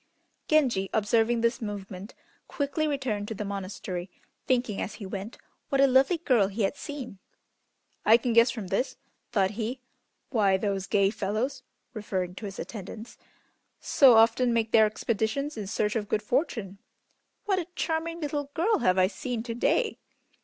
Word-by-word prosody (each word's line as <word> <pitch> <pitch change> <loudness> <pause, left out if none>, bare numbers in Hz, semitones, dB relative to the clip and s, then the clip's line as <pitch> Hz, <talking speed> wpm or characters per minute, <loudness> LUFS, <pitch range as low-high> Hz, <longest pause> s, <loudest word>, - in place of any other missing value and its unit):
Genji 250 -11 +2
observing 225 +2 +2
this 235 +2 +1
movement 200 -2 -6 0.3
quickly 285 +2 -1
returned 255 -8 -2
to 220 - -5
the 210 - -4
monastery, 185 -2 -5 0.4
thinking 245 -5 +1
as - - -4
he 205 - -8
went 195 +3 -6 0.3
what 275 - +1
a 275 - +7
lovely 270 +6 +4
girl 250 - +3
he 205 +2 -2
had 195 - 0
seen. 275 -10 -7 0.8
"I 225 +2 +7
can 240 0 -1
guess 230 +1 +6
from 220 -6 -5
this," 255 +7 -1 0.3
thought 195 -3 +2
he, 230 +4 -4 0.5
"why 200 -6 +3
those 195 -1 -2
gay 200 -2 +3
fellows 230 +6 -2 0.3
(referring 190 -5 -3
to 210 - -8
his 195 - -8
attendants) 220 +2 -8 0.6
so 265 -4 +6
often 230 +2 +4
make 230 -1 0
their 220 -1 +6
expeditions 230 +7 -2
in 210 -3 -5
search 210 +1 -1
of 210 -2 -2
good 215 - 0
fortune. 220 - -1 0.7
What 390 -3 +1
a 340 - -4
charming 330 +1 -2
little 290 -1 -3
girl 410 +6 +2
have 185 0 +2
I 185 - +5
seen 225 +4 -4
to 230 -1 -4
day! 440 - +1
225 Hz, 160 wpm, -27 LUFS, 200-265 Hz, 0.8 s, a